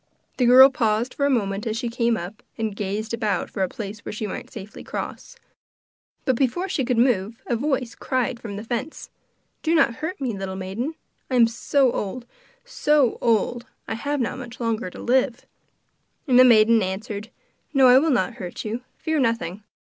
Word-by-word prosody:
The 250 - +3
girl 260 +2 +9
paused 225 -1 0
for 280 - +1
a - - +1
moment 205 -5 0
as 220 0 -1
she 240 +1 -2
came 230 0 +1
up, 185 +4 -7 0.2
and 220 -2 -2
gazed 210 +3 -3
about 215 -3 -1
for 195 - -4
a 185 - +1
place 210 -1 -7
where - - -7
she 215 +1 -4
might 205 - -6
safely 200 +2 -9
cross. - - -6 0.9
But 260 - +2
before 275 +9 0
she 310 -8 -1
could 245 -1 0
move 230 -2 +1
a 240 - 0
voice 255 -1 -1
cried 255 -2 -2
from 210 -4 -7
the 205 - -6
fence: 245 +6 -5 0.5
'Do 325 +1 +1
not 235 -7 +3
hurt 335 +5 -4
me, 250 -6 -2
little 195 -1 -5
maiden; 200 +11 -4 0.3
I 260 - -1
am 240 -2 +7
so 250 +3 +2
old, 235 +4 -4 0.4
so 295 - +2
old, 235 +1 +1 0.2
I - - -2
have 285 +6 -2
not 250 +1 -2
much 245 0 -9
longer 230 -5 -1
to - - -12
live.' 255 0 +1 0.8
And 250 -2 +5
the - - +10
maiden 225 -1 +6
answered: 205 +3 -4 0.4
'No, 275 -3 +5
I 250 +1 +8
will 320 +3 +1
not 255 -2 +1
hurt 180 +3 -6
you; 225 +3 -3 0.2
fear 315 -1 -1
nothing. 230 -6 -1
235 Hz, 190 wpm, -23 LUFS, 215-260 Hz, 0.9 s, the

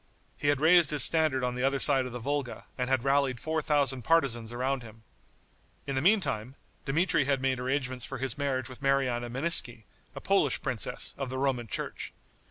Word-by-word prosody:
He 145 - -4
had 145 -2 +2
raised 165 0 +5
his 150 -2 +5
standard 155 -5 +2
on 125 0 -1
the 125 - -4
other 135 +1 +2
side 135 -2 +3
of - - -8
the 125 - -5
Volga, 140 +1 -4
and 125 -1 -3
had 130 -2 +1
rallied 135 -2 +1
four 160 +3 -2
thousand 140 -3 +1
partisans 120 -7 +1
around 130 +2 -2
him. 110 -1 -14 0.8
In 140 - -3
the 130 - 0
meantime, 135 - +1 0.3
Dmitri 165 +1 +1
had 140 -1 +1
made 130 -1 -1
arrangements 130 -1 -2
for 135 - -4
his 130 -1 -3
marriage 135 -3 -2
with 130 +1 -11
Mariana 130 -3 0
Meneiski, 125 -4 +1 0.3
a - - -5
Polish - - +1
princess, - - -3
of 135 -2 -3
the 130 - -4
Roman 130 -3 -1
church. - - -4
135 Hz, 190 wpm, -29 LUFS, 125-145 Hz, 0.8 s, raised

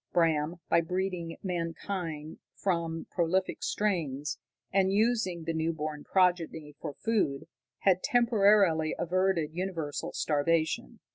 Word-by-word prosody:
Bram, 165 -1 +2
by 170 - +4
breeding 180 -1 -3
mankind 165 -3 -4 0.2
from 170 -3 -1
prolific 185 +2 0
strains, 155 -9 -1 0.3
and 190 0 +3
using 205 -5 +1
the 165 +1 -2
new 160 +1 0
born 150 -1 -4
progeny 170 -5 +1
for 150 -3 -5
food, 205 -11 0 0.3
had 185 -2 +4
temporarily 205 - +4
averted 175 -3 +1
universal 170 -5 -3
starvation. 155 - 0
170 Hz, 110 wpm, -30 LUFS, 160-190 Hz, 0.3 s, by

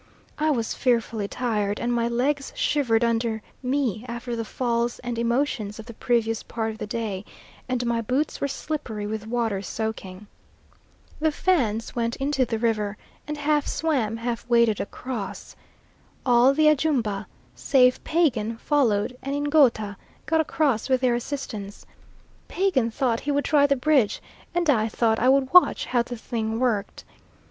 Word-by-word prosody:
I 310 +1 +2
was 235 -7 0
fearfully 230 -4 0
tired, 210 -4 -1
and 240 0 -1
my 235 -1 +1
legs 270 +4 0
shivered 240 -6 +1
under 230 -1 0 0.2
me 255 -5 -1
after 235 0 -4
the 230 - -2
falls 235 +1 -1
and 245 -1 -5
emotions 235 -3 -1
of 220 - -9
the 235 - -9
previous 225 -1 0
part 225 -1 -3
of 220 - -11
the - - -4
day, 210 -3 -3 0.5
and 250 -1 -1
my 235 -1 0
boots 255 +7 -1
were 280 - +1
slippery 260 -7 -4
with 215 +1 -4
water 225 -4 -1
soaking. 205 -1 -5 0.9
The 315 0 +2
Fans 250 - 0
went 235 0 -1
into 270 -1 0
the 230 -2 -2
river, 215 -3 -1 0.3
and 300 0 -4
half 295 0 +1
swam, 255 -9 0
half 235 0 -3
waded 235 -3 +3
across. 225 -1 -6 0.7
All 245 +1 +5
the 310 +1 +4
Ajumba, 260 -10 +1 0.3
save 250 -2 +3
Pagan, 240 -10 +1
followed, 245 -4 +1
and 275 +2 -3
Ngouta 275 -9 +2 0.3
got 320 0 +2
across 285 -7 0
with 260 -1 +2
their 250 -2 +3
assistance. 235 -5 -5 0.6
Pagan 355 -12 +1
thought 230 0 0
he 290 - -2
would 285 0 0
try 285 -2 +4
the 280 - +3
bridge, 255 -5 +2 0.4
and 350 -1 +1
I 225 -7 +3
thought 225 0 +1
I 250 - +3
would 265 +1 +2
watch 360 - +6
how 245 - +1
the 240 0 -6
thing 225 -1 -3
worked. 235 -6 -1
240 Hz, 155 wpm, -25 LUFS, 220-275 Hz, 0.9 s, watch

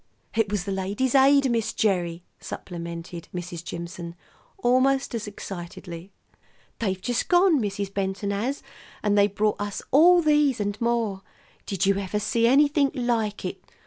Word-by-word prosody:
"It 225 -3 +1
was 205 -3 -1
the 200 - -4
Ladies' 200 +7 -1
Aid, 275 -1 +5
Miss 230 -2 0
Gerry," 175 -5 0 0.2
supplemented 170 -1 -7
Mrs. 175 -1 -5
Jimson 170 0 -7 0.4
almost 265 -2 +2
as 220 -2 -3
excitedly. 175 -2 -8 0.7
"They've 190 -4 -1
just 245 +5 -1
gone, 355 -5 +4
Mrs. 200 -1 -3
Benton 195 +1 -2
has, 235 +8 -2 0.4
and 205 -1 +2
they 200 0 +5
brought 210 +1 -1
us 205 -1 -4
all 345 +5 +6
these 295 -4 +3
and 205 +1 -3
more. 230 -5 0 0.5
Did 195 -1 0
you 195 0 +2
ever 200 +1 -2
see 230 +2 +2
anything 285 +2 +4
like 230 -5 -1
it? - - -5
205 Hz, 145 wpm, -25 LUFS, 190-250 Hz, 0.7 s, all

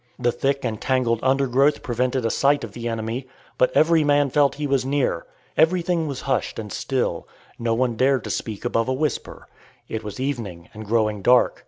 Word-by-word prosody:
The 120 -1 +1
thick 135 +2 -1
and 110 -3 -3
tangled 125 -3 +1
undergrowth 135 +2 +2
prevented 125 -1 -1
a 115 - +1
sight 140 +1 +2
of 115 - -6
the 120 +2 -5
enemy, 115 +3 -3 0.3
but 125 - +5
every 160 0 +5
man 145 -2 +3
felt 140 -1 +3
he 150 - -3
was 135 -2 +1
near. 135 -10 -1 0.3
Everything 170 -1 +2
was 140 -3 -4
hushed 135 -1 -1
and 105 -3 -6
still. 130 -2 -2 0.3
No 115 -1 0
one 120 -1 0
dared 130 +1 +2
to - - -4
speak 110 0 -4
above 115 -1 +1
a - - +2
whisper. 150 +2 -3 0.4
It 110 0 -4
was 105 0 -7
evening, 115 -11 -4
and 110 0 -9
growing 110 -2 +1
dark. 125 +5 +4
130 Hz, 190 wpm, -23 LUFS, 115-140 Hz, 0.4 s, but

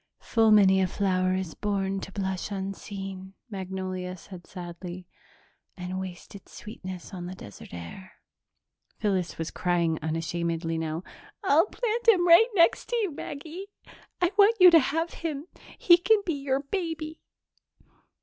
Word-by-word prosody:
"'Full 225 -1 +2
many 195 -3 +6
a 185 - +2
flower 185 -1 +1
is 185 -3 -3
born 195 -2 -1
to 195 - -8
blush 190 -1 -3
unseen,'" 195 -1 -6 0.2
Magnolia 185 -1 -4
said 180 0 -12
sadly, 175 0 -8 0.7
"'and 180 +1 -4
waste 185 -2 -8
its 200 - -13
sweetness 185 -4 -8
on 175 -1 -6
the 185 - -7
desert 100 - -12
air.'" 85 - -9 0.8
Phyllis 190 -5 -1
was 165 0 -4
crying 170 -3 0
unashamedly 165 +1 -2
now. 160 +1 -3 0.4
"I'll 330 0 +4
plant 470 +1 -2
him 365 -6 +6
right 340 +7 +8
next 340 -2 +4
to 485 - 0
you 425 -7 0
Maggie. 320 +7 -7 0.5
I 355 0 +2
want 425 +3 +6
you 360 -1 +10
to 330 - +8
have 325 +4 -1
him. 305 -3 -4 0.3
He 345 -1 +7
can 425 +3 +3
be 340 - 0
your 275 -1 -1
baby." 320 0 -4
195 Hz, 145 wpm, -27 LUFS, -, 0.8 s, you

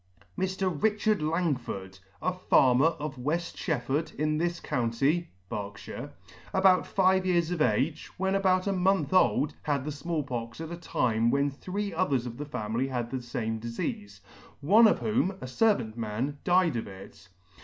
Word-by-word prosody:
Mr. 190 0 -1
RICHARD 215 -2 +2
LANGFORD, 135 - -2 0.2
a 185 +2 +1
farmer 135 -6 +4
of 150 -4 -4
Weft 165 +7 -2
Shef 155 -9 -2
ford, 145 +6 -1
in 155 +1 0
this 175 +1 -1
county, 135 +8 0 0.2
(Berks,) 100 0 -6 0.7
about 190 -1 +4
fifty 190 -1 +2
years 170 -1 +2
of 175 -3 -2
age, 135 +5 +1
when 190 +1 0
about 185 -2 +2
a 200 - +1
month 190 +1 +1
old 165 -5 +3
had 145 -3 -1
the 150 - -3
Small 150 +2 -3
Pox 115 -2 -5
at 165 0 -6
a - - -3
time 115 -9 0
when 140 +2 +2
three 200 +8 -4
others 140 -9 +1
of 120 -1 -6
the 145 - -5
family 120 -1 -2
had 120 -3 -3
the 130 - -2
fame 115 -2 -3
difeafe, 205 - -5 0.4
one 210 +10 +6
of - - +3
whom, 220 -2 +1
a 190 - -9
fervant 130 - +1
man, 120 +6 -3
died 175 -6 +3
of 115 - -4
it. 100 0 -12
150 Hz, 165 wpm, -28 LUFS, 125-185 Hz, 0.7 s, one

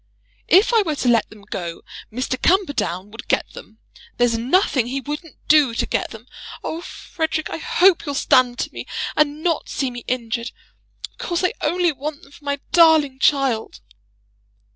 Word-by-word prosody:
"If 395 +6 +5
I 455 - +5
were 320 -7 -1
to 265 - -2
let 235 -2 +3
them 210 -1 -15
go, 170 -4 -6 0.3
Mr. 255 +2 -3
Camperdown 285 - +1
would 225 - -10
get - - 0
them. 220 - -13 0.4
There's 245 -1 +3
nothing 255 - +2
he 265 +2 -2
wouldn't 295 +4 -7
do 290 -6 +5
to - - 0
get - - -1
them. 225 +1 -11 0.4
Oh, 325 - -4
Frederic, 320 -2 -4
I - - -3
hope 350 0 +3
you'll 285 - -2
stand 250 -2 +3
to - - -4
me, - - -7 0.3
and 300 +1 +1
not 335 -3 0
see 270 -3 -2
me 245 -1 -8
injured. 235 -1 -3 0.6
Of - - -35
course 345 +1 -2
I 365 - +2
only 345 +2 +2
want 290 +1 -6
them 275 - -17
for 290 - -17
my 285 0 -2
darling 315 -6 +5
child." 270 -6 +1
280 Hz, 175 wpm, -21 LUFS, 240-320 Hz, 0.6 s, If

